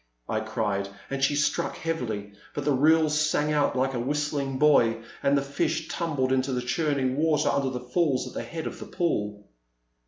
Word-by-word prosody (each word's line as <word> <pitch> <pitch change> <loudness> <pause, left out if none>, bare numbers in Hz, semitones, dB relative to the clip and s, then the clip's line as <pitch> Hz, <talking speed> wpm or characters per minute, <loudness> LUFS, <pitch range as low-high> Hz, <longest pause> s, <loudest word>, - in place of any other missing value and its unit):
I 110 - 0
cried, 105 -3 -2 0.2
and 135 0 -2
she 145 - +3
struck 150 - 0
heavily, 110 -11 -3 0.2
but 145 - -3
the 150 - +3
reel 155 +4 +4
sang 150 0 +1
out 145 -1 +2
like 135 +1 +1
a 125 - -2
whistling 140 +1 -1
buoy, 130 -6 +4 0.2
and 140 +1 +3
the 140 - +1
fish 155 +3 -1
tumbled 145 -7 -1
into 130 +1 +1
the 125 - 0
churning 135 -1 0
water 155 -1 +2
under 140 -1 +1
the 125 -1 -4
falls 145 -3 +1
at - - -9
the - - -3
head 165 -1 -6
of - - -5
the - - -8
pool. 105 - -2
140 Hz, 190 wpm, -27 LUFS, 125-150 Hz, 0.2 s, reel